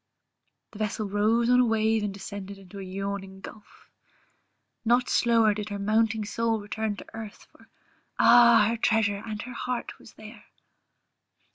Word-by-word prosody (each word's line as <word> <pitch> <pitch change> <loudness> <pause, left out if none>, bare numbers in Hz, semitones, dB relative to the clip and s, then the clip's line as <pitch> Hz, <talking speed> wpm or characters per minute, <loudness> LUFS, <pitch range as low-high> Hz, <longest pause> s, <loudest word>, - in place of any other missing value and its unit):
The 215 - -12
vessel 215 0 -2
rose 215 +4 +1
on 250 +1 +4
a 250 - +5
wave 220 0 +1
and 205 - -2
descended 200 0 -8
into 195 +1 -12
a - - -6
yawning 195 0 -5
gulph 210 +1 -14 1.0
Not 240 +2 +2
slower 230 -3 +3
did 210 0 -6
her 205 - -4
mounting 215 +1 +1
soul 230 +1 -1
return 210 +1 -3
to - - -10
earth, 220 -2 -9
for - - -22 0.5
Ah! 235 -2 +6
her 230 - -1
treasure 215 -3 +1
and 215 -2 -6
her 250 +1 -8
heart 250 0 -5
was - - -16
there. 215 0 -13
215 Hz, 155 wpm, -26 LUFS, 205-230 Hz, 1.0 s, Ah